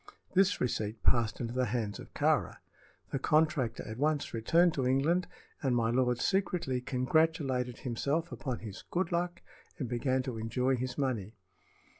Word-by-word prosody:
This 195 +1 +4
receipt 110 -3 -2
passed 115 -2 +2
into 115 -1 -3
the 125 0 +1
hands 110 -2 -2
of - - -11
Kāra. - - +2 0.5
The 135 - -1
contractor 150 -5 +2
at 110 +2 -6
once 150 0 0
returned 165 +10 +3
to 130 -3 0
England, 155 +8 +2 0.3
and 130 -4 +1
my 115 -1 +2
lord 125 0 +2
secretly 175 -9 0
congratulated 130 -1 +1
himself 140 +7 -1
upon 130 -5 -4
his 105 -3 -7
"good 180 0 -1
luck" 175 +1 -1 0.3
and 130 - -3
began 130 +2 0
to 125 -3 -4
enjoy 125 +4 +1
his 125 0 -4
money. 115 -7 -2
130 Hz, 155 wpm, -31 LUFS, 120-155 Hz, 0.5 s, This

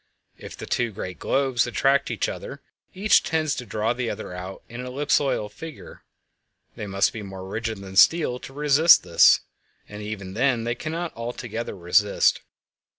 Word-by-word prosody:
If - - -10
two 120 -2 -2
great 90 -2 -7
globes 130 -3 +1
attract 135 +3 +2
each - - -1
other, - - -7 0.3
each 200 +3 +4
tends 155 -2 0
to 125 - -6
draw 110 +2 -1
the 120 -1 -3
other 105 -3 -6
out 90 +1 -8
into 120 +2 -7
an - - -6
ellipsoidal 140 -5 0
figure; 160 +6 -10 0.7
they 105 - -6
must 100 0 +1
be 110 - -6
more 95 -2 -8
rigid 110 +2 -3
than 95 -1 -10
steel 140 - +4
to - - -10
resist 150 +3 +5
this—and 105 0 +1
even 100 -3 -6
then 120 +1 +1
they 120 +1 -1
cannot 165 +6 -5
altogether 115 -2 -5
resist. 95 +4 +2
120 Hz, 155 wpm, -24 LUFS, 105-140 Hz, 0.7 s, resist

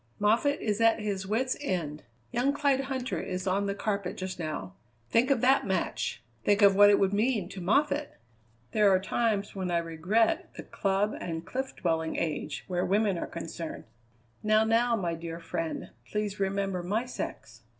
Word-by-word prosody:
Moffatt 230 +8 +3
is 210 0 -1
at 225 0 +5
his 200 -3 -3
wits' 250 +5 0
end. 165 - -2 0.3
Young 255 +4 +1
Clyde 280 -2 +1
Huntter 260 -1 -3
is 185 +1 -4
on 195 +2 +1
the 200 - -1
carpet 200 -3 -2
just 185 -1 -5
now. 155 - -4 0.4
Think 240 +4 +4
of 270 -5 +3
that 265 +2 +4
match! - - -1 0.2
think 205 0 +3
of 200 -1 +7
what 205 +1 +8
it 205 - +6
would 195 0 +2
mean 215 -2 +1
to 195 - -7
Moffatt! 285 +9 +1 0.5
There 210 -2 +4
are 190 -1 +5
times 205 +1 0
when 190 -2 -2
I 175 - +2
regret 170 +7 +1
the - - -7
club 195 +2 0
and 165 -1 -4
cliff 265 +4 -4
dwelling 160 -2 -1
age 155 -2 -2
where 180 -1 0
women 205 0 +2
are - - -3
concerned." 165 -1 -6 0.6
"Now, 215 +1 +4
now, 230 +2 +3
my 175 -6 -1
dear 165 0 -6
friend, 165 -1 -4 0.2
please 210 -1 -2
remember 195 -1 0
my 210 +7 -1
sex." 250 - -6
200 Hz, 175 wpm, -29 LUFS, 180-225 Hz, 0.6 s, what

